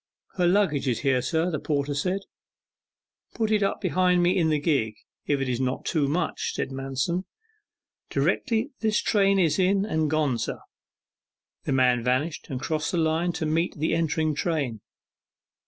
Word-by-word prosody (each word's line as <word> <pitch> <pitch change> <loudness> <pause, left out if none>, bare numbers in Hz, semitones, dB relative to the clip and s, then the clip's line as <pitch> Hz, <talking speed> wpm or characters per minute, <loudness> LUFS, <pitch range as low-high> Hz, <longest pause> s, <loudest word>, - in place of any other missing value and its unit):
'Her 180 -1 +3
luggage 175 -7 +2
is 120 -3 0
here, 135 -2 +2
sir,' 160 +7 0
the 155 - -2
porter 145 -1 -1
said. 180 +7 -1 1.1
'Put 220 -1 0
it 210 -1 +3
up 195 - 0
behind 180 -1 +2
me 180 +2 +3
in 165 -4 +2
the 155 - +2
gig 135 -8 0 0.3
if 145 -1 +1
it 135 - -1
is 125 0 -1
not 130 0 -2
too 150 -5 +1
much,' 165 +4 -1
said - - -2
Manston. 135 +7 -2 0.8
'Directly 235 +3 0
this 220 -1 +1
train 195 -2 +3
is 165 -4 +2
in 195 +2 +3
and 160 -7 0
gone, 145 -6 +1
sir.' 110 - -4 1.0
The - - 0
man 125 -2 +3
vanished 130 +6 -1
and 130 - -3
crossed 155 +2 -2
the 175 - -1
line 165 +2 +1
to 160 - -3
meet 165 +3 0
the 155 +2 0
entering 160 -1 +1
train. 145 - -2
155 Hz, 170 wpm, -26 LUFS, 135-180 Hz, 1.1 s, Her